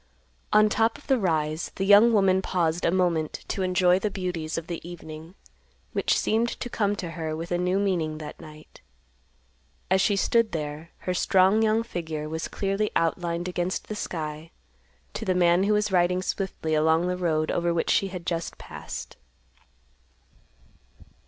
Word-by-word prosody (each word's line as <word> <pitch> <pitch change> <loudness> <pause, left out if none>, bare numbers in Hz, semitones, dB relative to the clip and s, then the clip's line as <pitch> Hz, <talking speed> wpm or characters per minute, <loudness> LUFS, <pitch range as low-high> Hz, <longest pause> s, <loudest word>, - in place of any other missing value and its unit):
On 215 0 +6
top 225 +3 +1
of 290 - -18
the 265 -2 +2
rise, 155 -4 -1
the 195 - -1
young 205 +4 +7
woman 195 -3 +3
paused 175 -2 0
a - - +3
moment 170 -4 0
to 195 - -2
enjoy 185 0 +3
the 210 - -1
beauties 180 -5 -4
of 165 - -4
the 170 -1 -5
evening, 165 0 -10 0.6
which - - +1
seemed 230 +2 +1
to 245 - -5
come 205 -3 0
to 175 -4 -5
her 160 -1 -4
with 165 +2 -6
a 175 - +1
new 180 +2 +1
meaning 175 -6 0
that 155 -1 -8
night. 155 0 -14 1.1
As 190 0 +4
she 205 - +2
stood 230 +3 +2
there, 155 +1 -4
her 180 - -2
strong 190 +3 +3
young 220 +1 +2
figure 160 -8 -5
was 160 +1 -4
clearly 200 +1 -1
outlined 170 +1 0
against 180 0 -3
the 215 - -3
sky 155 -4 -5 0.6
to - - -5
the 185 - 0
man 175 +1 +4
who 210 - +2
was 210 -1 +1
riding 180 0 +2
swiftly 185 -5 -3
along 160 +2 +3
the 180 0 0
road 160 -3 0
over 170 0 0
which 170 -1 0
she 195 - +2
had 180 -3 -7
just 170 -2 -3
passed. 65 0 -8
180 Hz, 170 wpm, -26 LUFS, 160-195 Hz, 1.1 s, young